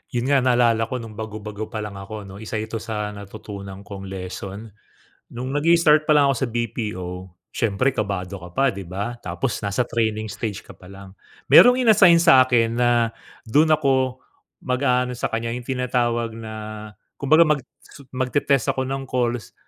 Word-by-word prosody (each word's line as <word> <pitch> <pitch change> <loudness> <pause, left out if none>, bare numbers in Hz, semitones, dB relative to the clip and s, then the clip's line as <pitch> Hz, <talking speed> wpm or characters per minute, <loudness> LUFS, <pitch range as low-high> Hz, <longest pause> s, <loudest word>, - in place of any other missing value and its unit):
Yun 125 +4 0
nga, 140 - +5
naalala 120 -3 +2
ko 130 - -4
nung 110 -2 -10
bago-bago 110 -1 -6
pa 110 -3 -5
lang 100 -2 -7
ako, 105 +2 -8
'no? 95 -1 -11
1 110 +1 -6
ito 110 +1 -3
sa 105 -1 -4
natutunan 100 -1 -9
kong 95 0 -9
lesson. 95 +3 -7 0.6
Nung 130 +3 -5
nag-i-start 155 0 +4
palang 145 -2 +5
ako - - -5
sa 135 - +1
BPO, 110 -5 -3 0.5
siyempre 115 +5 0
kabado 100 -4 -3
ka 90 - -9
pa, 110 +10 -1
di 100 - -7
ba? 100 +7 -4
Tapos 135 -3 -3
nasa 100 +4 -1
training 110 -2 -1
stage 105 -1 -5
ka - - -12
palang. 95 +1 -13 0.4
Merong 245 0 +8
in-assign 200 -7 +6
sa 165 -6 +7
akin 115 -2 +2
na 120 0 +3 0.6
dun 150 +8 +3
ako 135 -4 +2 0.5
mag-aano 125 -1 +1
sa 125 - -3
kanya 115 +1 -2
yung 120 0 -6
tinatawag 120 -3 -1
na 110 -1 -8 0.7
kumbaga 155 +4 +5
mag-t 150 -5 0 0.4
magte-test 130 0 0
ako 130 - -2
ng 135 +1 -3
calls 120 -3 -2
115 Hz, 160 wpm, -22 LUFS, 105-130 Hz, 0.7 s, Merong